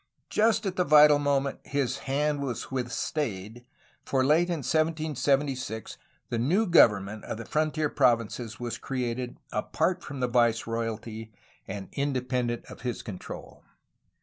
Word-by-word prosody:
Just 220 0 +3
at 190 -1 -2
the 180 - +3
vital 150 -2 +7
moment, 140 -1 0
his 135 -2 -1
hand 145 +1 +1
was 130 -3 -4
withstaid, 120 - -3 0.4
for 130 -1 +1
late 160 +5 +4
in 165 -5 -2
1776 145 -6 0 0.3
the 120 - -1
new 180 - +2
government 105 - +4
of - - -4
the 115 - -7
frontier 155 +2 0
provinces 120 -4 +1
was 120 -1 -4
created 125 -1 -3
apart 180 +11 0
from 140 -1 -7
the 125 - +1
viceroy 115 -1 +1
alty 110 0 -6 0.4
and 95 0 -6
independent 125 -4 -1
of - - -12
his 125 -2 -3
control. 105 -5 -8
130 Hz, 135 wpm, -28 LUFS, 115-150 Hz, 0.4 s, vital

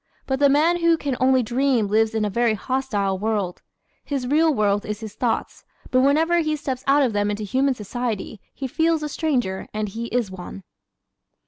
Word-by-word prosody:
But 265 -1 -1
the 285 -1 +5
man 315 +5 +3
who 335 -1 +3
can 280 -4 -2
only 260 0 +4
dream 250 0 +1
lives 220 +2 +1
in 215 -1 +1
a - - 0
very 235 +1 +2
hostile 210 -6 -1
world. 205 -4 -2 0.4
His 275 -3 -3
real 310 +5 +3
world 205 -5 +1
is 210 0 -5
his 215 -2 -7
thoughts 235 0 -2 0.3
but 255 - +4
whenever 320 +5 +3
he 310 -2 0
steps 265 -3 -4
out 280 +1 +5
of 245 -5 0
them 205 0 +1
into 210 +1 -3
human 260 +6 +1
society 220 -1 -4
he 275 - -6
feels 320 +4 +1
a - - -1
stranger 250 - -1
and 215 -1 -2
he 230 +4 -5
is 235 -5 -1
one. 185 +1 -9
245 Hz, 195 wpm, -23 LUFS, 210-280 Hz, 0.4 s, the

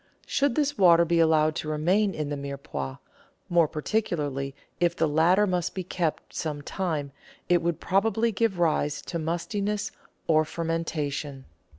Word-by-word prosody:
Should 280 -3 +1
this 290 -1 0
water 170 -2 +6
be 170 0 +2
allowed 155 -1 +4
to 155 - -4
remain 180 +6 +1
in 150 -2 -3
the 145 - -2
Mirepoix, 140 - -5 0.5
more 170 -2 +4
particularly 150 -6 -2 0.2
if 175 -1 +2
the 160 - +2
latter 170 +7 +4
must 180 -3 -1
be 190 - -3
kept 170 -3 -3
some 150 -3 -3
time, 155 -6 -2 0.4
it 175 -1 +4
would 170 -1 -1
probably 220 +4 +1
give 215 -2 0
rise 150 -4 +1
to 170 - -4
mustiness 200 +6 -2 0.3
or 155 -1 +4
fermentation. 155 -4 -3
165 Hz, 150 wpm, -27 LUFS, 150-185 Hz, 0.5 s, water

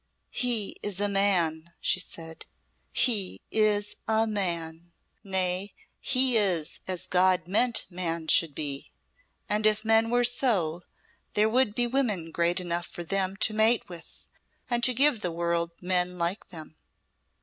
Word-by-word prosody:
"He 235 -5 0
is 200 -2 -3
a 205 - +2
Man," 170 -5 +1
she - - 0
said 165 -2 -6 0.4
"he 210 -7 +1
is 210 -1 +1
a 220 0 +2
Man! 170 -5 -3 0.3
Nay, 190 0 -1 0.2
he 255 -2 +3
is 180 -7 +1
as 185 -1 -3
God 185 -2 +2
meant 230 +5 +2
man 170 -3 -4
should 160 -2 +3
be. 140 -2 -3 0.6
And 215 +1 +1
if 215 +1 0
men 225 0 +3
were 245 +1 +2
so, 230 - +1 0.5
there 210 +1 +3
would 230 -2 +1
be 245 - +2
women 225 -10 -1
great 170 +2 0
enough 175 -2 -3
for 175 +1 -7
them 190 +2 -1
to 215 - +2
mate 220 +2 +3
with 170 -2 -12 0.5
and 240 0 0
to 255 - +3
give 270 -3 +3
the 175 - -2
world 170 0 -1
men 180 0 0
like 175 +4 -2
them." 155 -3 -11
190 Hz, 150 wpm, -27 LUFS, 170-220 Hz, 0.6 s, he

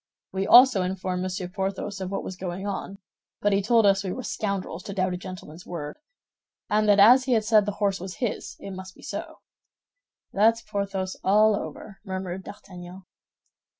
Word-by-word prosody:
We 195 +1 -2
also 245 -3 +8
informed 185 0 -2
Monsieur 185 0 -3
Porthos 195 +1 -4
of 185 - -3
what 195 - -3
was 185 - -6
going 180 +1 -5
on; 200 0 -4 0.4
but 205 0 +1
he 195 - +2
told 225 +2 +3
us 195 -1 +4
we 190 - -3
were 255 - -5
scoundrels 195 -6 -3
to 200 - -5
doubt 185 -1 0
a - - -3
gentleman's 180 -2 -9
word, 150 - -6 0.7
and 215 0 +3
that 205 0 +5
as 245 +6 +7
he 260 - +1
had 220 -2 +2
said 215 -2 +4
the 205 - -1
horse 200 -1 0
was 185 +1 -7
his, 240 -4 -4
it 200 - -8
must 190 0 -9
be - - -17
so." - - -7 0.9
"That's 225 +3 +3
Porthos 195 -3 -3
all 210 +2 +4
over," 200 0 -7
murmured 190 -2 -5
D'Artagnan. 185 -2 -11
195 Hz, 185 wpm, -25 LUFS, 185-210 Hz, 0.9 s, also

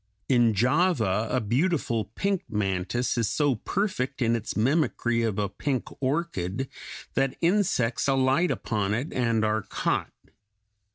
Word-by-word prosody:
In 120 -4 +4
Java 120 - +2
a 125 - +1
beautiful 120 - 0
pink 195 - -2
mantis 105 +4 -1
is 115 - +1
so 145 -3 +2
perfect 160 - -2
in 115 -2 +2
its 115 -2 -4
mimicry 120 -2 +1
of 110 -3 -1
a 105 -1 +1
pink 130 +6 -3
orchid 135 - -1 0.4
that 135 -1 +1
insects 170 - +1
alight 135 +5 +3
upon 105 -5 -1
it 130 +8 -3
and 115 -3 +1
are 110 0 +1
caught. - - -1
120 Hz, 130 wpm, -26 LUFS, 110-145 Hz, 0.4 s, In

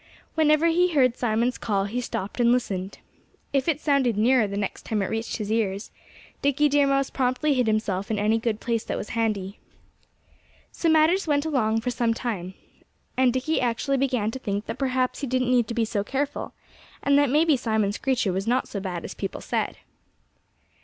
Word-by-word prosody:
Whenever 305 0 +3
he 350 +1 +3
heard 255 -4 +4
Simon's 235 +1 0
call 200 -3 0
he 235 +5 -3
stopped 205 -2 -5
and 240 -1 +4
listened. 195 -6 -1 0.6
If 275 +1 +1
it 310 -3 +1
sounded 275 -8 +1
nearer 235 0 +4
the 200 0 -4
next 205 -2 -3
time 210 -3 -1
it 190 - -3
reached 225 +1 -3
his 210 -2 -4
ears, 210 -2 -1 0.5
Dickie 285 +1 +3
Deer 285 0 +3
Mouse 275 -1 +1
promptly 260 +3 +1
hid 250 -3 +1
himself 215 -3 -1
in 220 - 0
any 215 +2 +2
good 225 -2 -1
place 230 -2 -1
that - - -3
was - - -6
handy. 210 -4 -2 1.1
So 335 - 0
matters 320 +4 +4
went 290 0 +1
along 225 -7 +1
for 250 +2 -2
some 235 -1 0
time. 190 -7 -4 0.6
And 255 -1 +4
Dickie 260 +6 0
actually 250 +3 0
began 250 -5 0
to 265 - -6
think 205 -3 -3
that - - -6
perhaps 255 -2 0
he 280 - -2
didn't 255 0 0
need 240 -3 +3
to 230 - -4
be 230 -2 +2
so 210 -2 -2
careful, 275 +6 -3 0.5
and 280 0 +3
that 285 -2 +3
maybe 305 +2 +4
Simon 220 -5 0
Screecher 230 -4 0
was 195 +3 -2
not 250 +2 +1
so 200 - -5
bad 180 -3 -5
as - - -6
people 195 - -5
said. - - -2
240 Hz, 195 wpm, -25 LUFS, 215-275 Hz, 1.1 s, heard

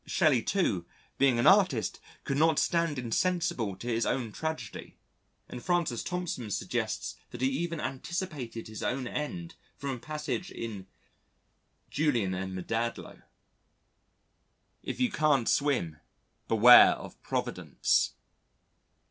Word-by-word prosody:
Shelley, 150 -9 +3
too, 110 - 0 0.3
being 135 -3 +4
an 120 - +1
artist 185 - +4 0.2
could 140 - -2
not 160 0 +4
stand 170 -4 +1
insensible 125 - 0
to 120 - -11
his 115 -1 +1
own 125 -4 -1
tragedy 160 +7 -5 0.5
and 125 - -8
Francis 170 -10 0
Thompson 175 -11 -4
suggests - - -3
that 120 - -9
he 130 - +3
even 165 +4 -2
anticipated 140 -6 -4
his 110 -1 -8
own 130 +1 -1
end 165 +5 -4 0.2
from 140 -1 -3
a 130 - -5
passage 155 +6 -4
in 105 -5 -6 1.0
Julian 120 -11 +1
and 95 0 -4
Maddalo, 115 +5 -3 0.8
"... - - -45 0.7
if - - -5
you 250 -3 +2
can't 150 - +2
swim, 125 - +1 0.5
Beware 120 +2 +8
of - - -10
Providence." - - 0
135 Hz, 120 wpm, -29 LUFS, 115-165 Hz, 1.0 s, Beware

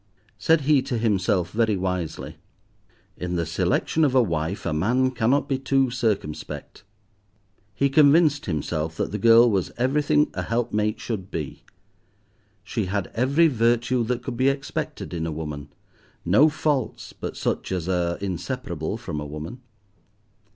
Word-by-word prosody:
Said 160 -1 +3
he 140 -1 +4
to 130 -2 -3
himself, 95 -5 +1
very 110 -2 +1
wisely, 90 -3 -3 0.8
"In 90 0 -3
the 85 -1 0
selection 85 - 0
of 135 -3 +2
a 130 - +6
wife 85 -1 -2
a 85 - 0
man 125 +11 +2
cannot 125 +3 +1
be 135 -2 -1
too 135 -1 +1
circumspect." 110 - -3 0.9
He 140 - +2
convinced 145 +1 +4
himself 80 -1 -2
that - - -2
the 105 - -3
girl 115 +3 +7
was 100 -6 0
everything 145 +4 +2
a 90 - -3
helpmate 110 0 -1
should 95 -5 -4
be. 75 -4 -5 1.0
She 105 0 -2
had 100 +1 -2
every 140 +8 +3
virtue 120 -1 +2
that 125 +1 -2
could 130 -3 -5
be 130 +2 +4
expected 140 -7 -4
in 80 -1 -2
a - - -3
woman, 75 -2 -6 0.6
no 105 - +5
faults, 150 -5 -2
but - - -6
such - - -2
as 90 -2 -2
are 85 -2 0
inseparable 95 - -4
from 85 -10 -5
a 75 - -5
woman. 75 - -7
110 Hz, 150 wpm, -24 LUFS, 90-130 Hz, 1.0 s, girl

